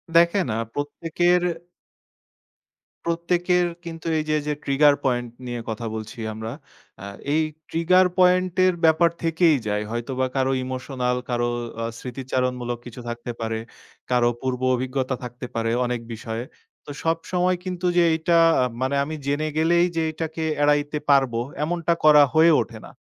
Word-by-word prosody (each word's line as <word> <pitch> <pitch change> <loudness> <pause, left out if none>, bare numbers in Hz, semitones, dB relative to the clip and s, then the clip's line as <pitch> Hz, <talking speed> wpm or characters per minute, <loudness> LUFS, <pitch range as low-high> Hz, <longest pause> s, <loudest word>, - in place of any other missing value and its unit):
দেখেন, 170 +2 +4
আ - - -1
প্রত্যেকের 165 +4 +1 1.6
প্রত্যেকের 175 +1 +1 0.2
কিন্তু 165 0 -7
এই 155 - 0
যে। 155 - +2
যে, 150 - +1
ট্রিগার 145 +1 +4
পয়েন্ট 120 -2 0 0.2
নিয়ে 120 -1 -4
কথা 110 +1 -4
বলছি 110 +2 -7
আমরা। 110 +1 -6 0.5
আ - - -6 0.3
এই 160 - +3 0.3
ট্রিগার 185 +3 +4
পয়েন্ট 180 0 +4
এর 185 - +4
ব্যাপার 160 +1 +5
থেকেই 165 -1 +3
যায়। 105 0 0
হয়তোবা 130 +2 -2
কারো 130 0 +1
ইমোশনাল 130 -1 -2
কারো 120 0 0 0.3
আ - - -1
স্মৃতিচারণমূলক 125 -1 -3
কিছু 120 0 -9
থাকতে 120 +1 -5
পারে। 110 0 -2 0.5
কারো 120 -1 +4
পূর্ব 130 -1 -2
অভিজ্ঞতা 130 +1 -2
থাকতে 125 +1 -7
পারে 115 0 0
অনেক 120 -1 -2
বিষয়ে। 115 +1 -5 0.4
তো - - -12
সবসময় 180 +2 0
কিন্তু 180 -1 -4
যে 175 - +6
এইটা 160 +2 +1 0.5
মানে 130 +2 0
আমি 155 +2 -5
জেনে 145 +2 0
গেলেই 170 +2 +4
যে 165 - +2
এটাকে 160 0 -4 0.2
এড়াইতে 145 0 +2
পারবো, 135 -4 +4 0.2
এমনটা 170 +1 0
করা 150 -1 +8
হয়ে 160 +1 +6
ওঠে 115 - -7
না। - - -12
145 Hz, 145 wpm, -23 LUFS, 125-165 Hz, 1.6 s, করা